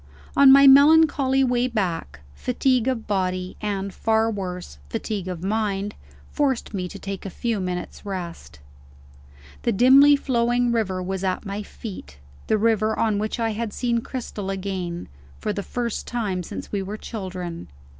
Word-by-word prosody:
On 275 -1 +8
my 275 +1 +8
melancholy 280 -1 +6
way 250 -1 +2
back, 170 - -3
fatigue 250 - +1
of 250 -4 -1
body 185 -2 -1
and, 200 -2 -3
far 225 0 +1
worse, 180 - -6
fatigue 195 - -3
of 180 -2 -5
mind 205 0 -1 0.4
forced 270 -7 0
me 185 -2 -2
to - - -9
take 195 -1 -6
a 195 - -5
few 230 +3 -2
minutes' 180 -1 -4
rest. 175 - -6 1.0
The 235 - +1
dimly 270 +6 +7
flowing 245 -2 +1
river 190 -6 -1
was 190 +1 -3
at 190 +3 -1
my 200 +1 -4
feet; 190 - -9 0.3
the 220 - +3
river 220 0 +2
on 215 -3 +1
which 215 +3 -2
I 225 -1 +1
had 220 0 -4
seen 235 -2 0
Cristel 230 -6 -5
again, 185 -3 -4 0.3
for 210 - -2
the 205 - -3
first 235 +2 -3
time 210 -7 -2
since - - -7
we 200 - -1
were 200 +3 -5
children. 185 -6 -6
210 Hz, 155 wpm, -23 LUFS, 185-240 Hz, 1.0 s, On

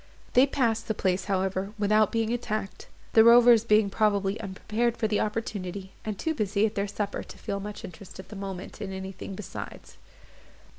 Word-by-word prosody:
They 255 +3 +6
passed 230 -5 0
the 220 - -1
place, 185 -2 0
however, 190 0 -1
without 215 0 +3
being 225 0 0
attacked; 215 -4 -4 0.3
the 220 - +8
rovers 235 -1 +7
being 210 -3 +3
probably 200 -1 +1
unprepared 220 +4 -1
for 220 - +1
the 210 -1 +1
opportunity, 200 -3 -3
and 215 -2 -4
too 320 - -1
busy 210 -4 +1
about 220 - -1
their 200 -1 -1
supper 205 0 -3
to - - -11
feel 200 - -4
much 205 +1 -7
interest, 180 +2 -11
at 190 - -10
the 215 - -9
moment, 195 -2 -7
in 195 - -4
anything 190 0 -6
besides. 210 - -8
210 Hz, 180 wpm, -27 LUFS, 195-225 Hz, 0.3 s, the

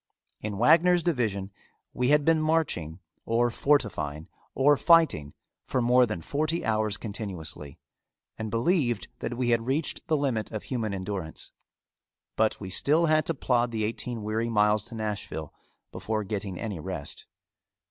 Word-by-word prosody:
In 105 -2 -4
Wagner's 170 - +5
division 110 - -1 0.4
we 125 - 0
had 150 0 +4
been 160 -1 +4
marching, 155 - 0 0.3
or 120 +1 +1
fortifying, 105 - 0 0.3
or 145 +3 +5
fighting 155 - +3 0.3
for 130 - 0
more 125 +1 +4
than 105 -6 -4
forty 155 - -1
hours 110 -2 +1
continuously, 90 - -6 0.6
and 110 0 -5
believed 120 - +1
that 120 - -4
we 125 -1 0
had 115 0 +1
reached 145 +4 -1
the 155 - +2
limit 130 -7 -1
of 110 -2 -5
human 115 -5 -2
endurance, 95 -4 -5 0.8
but 110 -1 +1
we 95 -2 -7
still 155 - +3
had 155 -1 +2
to 165 - 0
plod 120 -3 +1
the 110 -2 -2
eighteen 115 +1 -3
weary 110 +2 -1
miles 105 -1 +3
to 120 - -9
Nashville 105 -8 -4 0.4
before 110 -1 -2
getting 100 -3 -4
any 105 -7 -4
rest. 75 -4 -6
115 Hz, 145 wpm, -27 LUFS, 100-140 Hz, 0.8 s, Wagner's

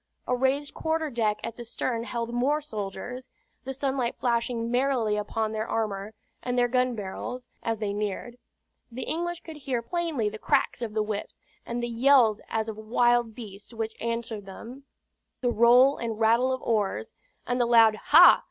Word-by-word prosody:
A 250 - +2
raised 270 +3 0
quarter 320 -1 -1
deck 220 -3 +1
at 230 0 -5
the 240 - -6
stern 230 0 -3
held 235 -1 -4
more 270 +5 +2
soldiers, 245 0 -6 0.4
the 265 - -3
sunlight 265 -3 -1
flashing 235 -1 0
merrily 245 -4 +1
upon 215 +1 -2
their 220 +1 -3
armor 210 -1 -2 0.3
and 250 0 -2
their 245 0 +4
gun 250 0 +1
barrels; 230 +5 -6
as 225 -1 -1
they 205 -2 -2
neared, 210 +4 -4 0.5
the 250 +3 -5
English 345 +1 -3
could 320 -2 -10
hear 260 -5 -2
plainly 325 -6 -1
the 215 +1 -5
cracks - - +1
of 220 -2 -4
the 215 - +2
whips, 210 -1 -5 0.3
and 240 0 -3
the - - 0
yells 235 -2 +4
as 220 0 -1
of 220 -1 -5
wild 240 +1 +2
beasts 210 -1 -10
which 225 0 -3
answered 230 -3 -3
them; 245 +8 -10 0.6
the 245 -2 +1
roll 245 +4 +6
and 225 -2 -4
rattle 230 +3 +3
of 260 - -3
oars, 210 -4 -1 0.3
and 245 0 0
the 240 - +2
loud 230 -2 +6
"Ha!" 320 +10 +7
235 Hz, 175 wpm, -27 LUFS, 220-255 Hz, 0.6 s, Ha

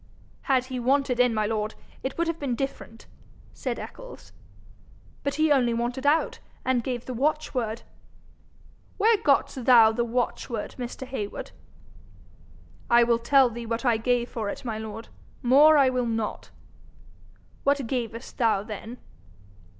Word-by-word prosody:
'Had 260 -2 +3
he 255 -1 -5
wanted 260 0 +1
in, 250 -1 +4
my 215 -1 0
lord, 215 0 -2 0.3
it 265 - -4
would 340 - +1
have 330 -1 -3
been 270 -4 -2
different,' 270 -3 -6 0.5
said - - -4
Eccles. - - -10 0.9
'But 280 - -2
he 310 0 +2
only 245 -4 +3
wanted 245 +4 -2
out, 310 +3 +2 0.3
and 255 -2 +1
gave 245 -2 -4
the 255 - -5
watchword.' 250 -4 -1 1.1
'Where 440 +2 +4
got'st 275 -6 +1
thou 230 -4 +7
the 235 +2 -1
watchword, 235 -1 -3
Mr. 245 +2 -5
Heywood?' 250 -6 -5 1.4
'I 235 0 +6
will 235 0 +2
tell 260 +1 +4
thee 235 0 -7
what 230 +3 -3
I 235 -2 +3
gave 240 +1 0
for 220 -5 -4
it, 255 - -7
my 220 -3 -3
lord. 220 +1 -7 0.3
More 290 +5 +7
I 270 -2 +5
will 250 -1 -1
not.' 225 -2 -3 1.1
'What 280 -2 +2
gavest 235 0 -5
thou 220 -5 +2
then?' 220 +3 -8
245 Hz, 145 wpm, -26 LUFS, 230-270 Hz, 1.4 s, thou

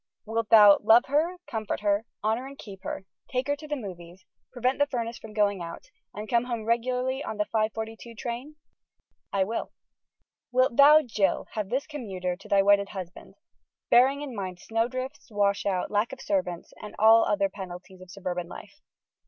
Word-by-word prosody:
Wilt 225 0 -2
thou 210 -2 +8
love 225 +3 +6
her, 320 +6 +1
comfort 220 -7 -4
her, 205 +1 +1 0.2
honor 225 +5 0
and 275 0 -11
keep 195 -6 -11
her, 190 - -5 0.3
take 255 0 0
her 285 +1 0
to 305 +1 -11
the 295 - -2
movies, 180 -6 -9 0.3
prevent 255 +2 0
the 285 - +3
furnace 235 -4 -4
from 220 - -11
going 205 -3 +1
out, 170 0 -7 0.3
and 210 +1 -7
come 235 +1 +2
home 235 -3 -4
regularly 250 +3 0
on 220 - -5
the 210 - +1
5:42 220 +1 -3
train?" 245 +6 -5 0.8
"I 195 -1 +2
will." 225 +4 -4 0.8
"Wilt 255 -1 +2
thou, 300 +3 +8
Jill, 205 -6 0
have 210 -3 -4
this 260 +4 -1
commuter 190 - -4
to 195 - -15
thy 200 -2 +4
wedded 200 0 +4
husband, 185 -2 -9 0.6
bearing 270 +4 +5
in 265 -5 -7
mind 185 -3 -5
snowdrifts, 255 +7 -3
washouts, 200 -3 0
lack 210 +2 +1
of 265 - -8
servants 275 - -2
and 210 - -9
all 225 +1 +7
other 200 -1 +1
penalties 185 -1 -10
of 185 - -13
suburban 180 -2 -4
life? 205 - -12
220 Hz, 175 wpm, -27 LUFS, 200-255 Hz, 0.8 s, thou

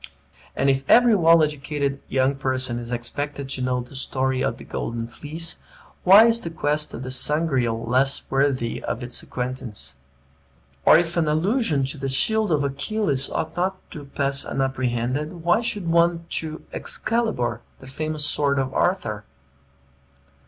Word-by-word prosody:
And 135 - +1
if 135 0 +2
every 240 -1 +6
well 165 -4 +5
educated 145 -2 -2
young 130 +1 +1
person 130 -3 -2
is 120 0 -8
expected 140 +4 -4
to 135 - -3
know 125 0 0
the 125 +3 -12
story 130 -1 -1
of - - -1
the - - -11
Golden 115 0 -4
Fleece, 155 +7 -4 0.4
why 200 +5 +8
is 230 0 +3
the 170 - -5
quest 150 -2 -1
of 120 - -7
the 130 - -5
Sangreal 130 -5 +1
less 130 +3 +1
worthy 135 -3 0
of 120 - -3
his 120 0 -3
acquaintance? 125 - -5 0.9
Or - - +8
if 170 0 -1
an 165 -2 +2
allusion 160 - +1
to 135 +2 -3
the 135 0 -2
shield 215 +9 +2
of 150 -2 +2
Achilles 140 0 -1
ought 160 - -3
not 185 +2 -1
to 145 -2 -8
pass 140 0 -1
unapprehended, 135 +4 -2
why 175 +6 +3
should 210 -6 -1
one 170 0 +2
to 155 0 0
Excalibar, 165 - 0 0.2
the - - -13
famous 155 +3 -3
sword 140 -2 +1
of 135 -1 -1
Arthur? 140 - 0
140 Hz, 155 wpm, -23 LUFS, 130-165 Hz, 0.9 s, why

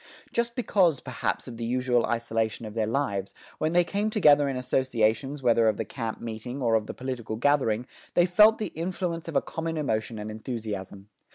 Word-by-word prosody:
Just 235 0 0
because, 185 - +2
perhaps, 120 -6 -3
of 120 -2 -8
the 115 - -5
usual 125 0 +1
isolation 115 -1 -1
of 105 - -7
their 110 -1 0
lives, 100 -6 -1 0.2
when 155 +1 0
they 175 0 +5
came 205 +4 -1
together 150 -9 +5
in 135 - -2
associations 130 +2 0
whether 115 -2 +4
of 110 - +2
the - - -2
camp 115 -4 -5
meeting 115 +3 -6
or 120 -4 +1
of 110 -1 +2
the - - -5
political 125 -4 -4
gathering, 120 -2 +2 0.3
they 175 - +5
felt 210 +5 +6
the 215 - -4
influence 170 0 -3
of 165 - -6
a - - +3
common 165 0 -4
emotion 110 -6 -1
and 105 +1 -5
enthusiasm. 105 -3 -6
125 Hz, 190 wpm, -27 LUFS, 110-160 Hz, 0.3 s, felt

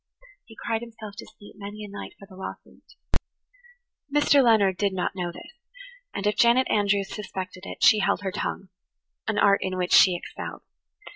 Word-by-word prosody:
He 225 - -15
cried 225 -1 -1
himself 225 -3 -9
to - - -8
sleep 205 - -16
many 205 +1 -7
a - - -6
night 200 0 -8
for 200 - -13
the 190 -1 -15
loss 190 - -6
of - - -19
it. 485 - -8 0.9
Mr. 290 -1 +5
Leonard 205 -6 +4
did 200 -2 +1
not 180 -1 -1
know 175 -2 -3
this, 295 - -12 0.6
and 195 - -4
if 210 - +2
Janet 240 +2 +5
Andrews 200 -1 +1
suspected 190 -2 -6
it - - -6
she 215 - +7
held 195 - +1
her 195 -2 -2
tongue–an 65 - -6
art 200 0 +5
in 185 -1 -2
which 180 -1 0
she 185 -2 +7
excelled. 175 - -7
200 Hz, 185 wpm, -26 LUFS, 185-220 Hz, 0.9 s, she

